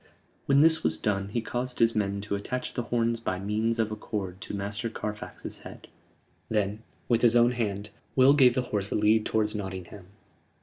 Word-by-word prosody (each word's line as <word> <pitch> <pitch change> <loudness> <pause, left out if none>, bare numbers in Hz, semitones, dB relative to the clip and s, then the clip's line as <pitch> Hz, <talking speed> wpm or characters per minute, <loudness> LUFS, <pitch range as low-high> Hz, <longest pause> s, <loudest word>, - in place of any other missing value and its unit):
When 140 0 +5
this 160 +1 +4
was 80 0 +1
done 100 +2 -1
he 115 +3 -1
caused 125 +2 -3
his 115 0 +4
men 100 -1 0
to 105 0 -4
attach 125 +5 -3
the - - -1
horns 115 0 0
by 95 -5 -2
means 110 +4 -1
of 110 -1 0
a - - -2
cord 95 -3 -5
to - - -5
Master 100 +3 -3
Carfax's 105 -1 -6
head; - - -11 0.6
then, 105 0 0 0.3
with 120 -2 +2
his 120 -1 +5
own 120 0 +5
hand, 105 -4 -3 0.2
Will 130 +1 +7
gave 130 -4 +5
the 130 - +1
horse 100 -1 0
a - - -2
lead 105 +1 +3
towards 105 -1 +1
Nottingham. 95 -2 -6
110 Hz, 190 wpm, -28 LUFS, 100-120 Hz, 0.6 s, Will